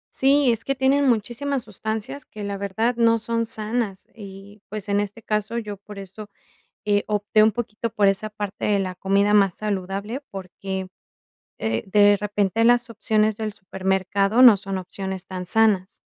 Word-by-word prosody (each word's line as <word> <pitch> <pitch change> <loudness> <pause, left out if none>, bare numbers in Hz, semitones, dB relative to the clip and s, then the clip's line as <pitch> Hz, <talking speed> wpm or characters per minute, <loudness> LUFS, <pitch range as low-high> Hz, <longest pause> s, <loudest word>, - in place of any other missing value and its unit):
Sí, 275 -1 +4
es 230 -1 -2
que 275 - -1
tienen 270 +1 +3
muchísimas 245 +4 -1
sustancias 220 +5 -5
que, 210 - -9
la 200 0 -3
verdad, 200 +5 -1
no 230 -1 +4
son 230 +1 -2
sanas 215 -2 -3
y, 200 0 -12
pues, 215 -1 -6
en 200 0 +1
este 205 +2 -4
caso, 215 +1 -2
yo 210 -3 -5
por 205 +1 -12
eso, 195 +2 -9 0.6
eh, 205 -1 +1
opté 210 +1 +2
un 220 - +3
poquito 230 0 -4
por 210 -2 +3
esa 195 +2 -1
parte 210 -2 -5
de 205 -1 +2
la 185 -1 -4
comida 200 +2 +2
más 195 -3 +4
saludable, 200 +3 -3
porque, 190 0 -6 0.7
eh, 110 0 -2
de 205 +1 +5
repente, 205 +1 0
las 240 +1 +4
opciones 215 -1 +1
del 215 0 -4
supermercado 190 +2 0
no 240 -4 +10
son 195 0 -4
opciones 190 0 -6
tan 185 -1 -5
sanas. 205 -1 +1
210 Hz, 165 wpm, -23 LUFS, 195-225 Hz, 0.7 s, no